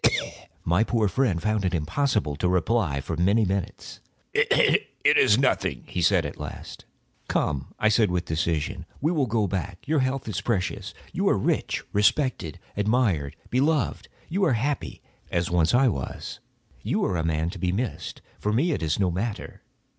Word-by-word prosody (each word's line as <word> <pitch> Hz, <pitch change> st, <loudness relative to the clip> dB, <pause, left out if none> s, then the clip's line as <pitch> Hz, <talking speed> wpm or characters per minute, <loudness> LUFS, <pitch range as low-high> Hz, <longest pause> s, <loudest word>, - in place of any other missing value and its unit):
My 85 Hz, +6 st, +3 dB
poor 115 Hz, -2 st, +1 dB
friend 105 Hz, -5 st, +1 dB
found 110 Hz, +2 st, 0 dB
it 90 Hz, -1 st, 0 dB
impossible 90 Hz, -, 0 dB
to 90 Hz, -, +1 dB
reply 90 Hz, -5 st, +1 dB
for 80 Hz, -, -4 dB
many 100 Hz, +7 st, +3 dB
minutes. 95 Hz, -1 st, -4 dB, 0.3 s
"It -, -, +4 dB, 0.2 s
is 105 Hz, -, +6 dB
nothing," 135 Hz, +1 st, +1 dB
he 90 Hz, -, -3 dB
said, 85 Hz, -1 st, +3 dB
at 75 Hz, -, -6 dB
last. -, -, -8 dB, 0.4 s
"Come," 70 Hz, -3 st, -1 dB
I 110 Hz, -, +2 dB
said, 110 Hz, -1 st, +3 dB
with 90 Hz, -1 st, -1 dB
decision, 80 Hz, -1 st, -2 dB
"we 155 Hz, +4 st, +1 dB
will 145 Hz, -7 st, +1 dB
go 110 Hz, -1 st, +1 dB
back; 95 Hz, -, -4 dB
your 155 Hz, 0 st, +2 dB
health 130 Hz, -1 st, -1 dB
is 110 Hz, -, -2 dB
precious. 95 Hz, -6 st, -2 dB, 0.2 s
You -, -, +1 dB
are -, -, +3 dB
rich, -, -, -1 dB
respected, 105 Hz, -, +1 dB, 0.2 s
admired, 100 Hz, -, +1 dB, 0.2 s
beloved; 140 Hz, 0 st, +1 dB, 0.2 s
you 195 Hz, +4 st, -1 dB
are 160 Hz, -8 st, +4 dB
happy, 135 Hz, +6 st, -2 dB, 0.3 s
as 85 Hz, 0 st, -1 dB
once 85 Hz, -2 st, +3 dB
I 130 Hz, +2 st, +4 dB
was. 70 Hz, -, -4 dB, 0.4 s
You -, -, 0 dB
are -, -, 0 dB
a 80 Hz, -, 0 dB
man 80 Hz, +1 st, 0 dB
to -, -, -9 dB
be 90 Hz, -1 st, 0 dB
missed. 110 Hz, +4 st, -4 dB, 0.2 s
For 105 Hz, -, -1 dB
me 140 Hz, +11 st, +2 dB
it 145 Hz, -, -1 dB
is 80 Hz, +2 st, 0 dB
no 95 Hz, -3 st, +2 dB
matter. 100 Hz, +5 st, -4 dB
100 Hz, 170 wpm, -25 LUFS, 85-120 Hz, 0.4 s, is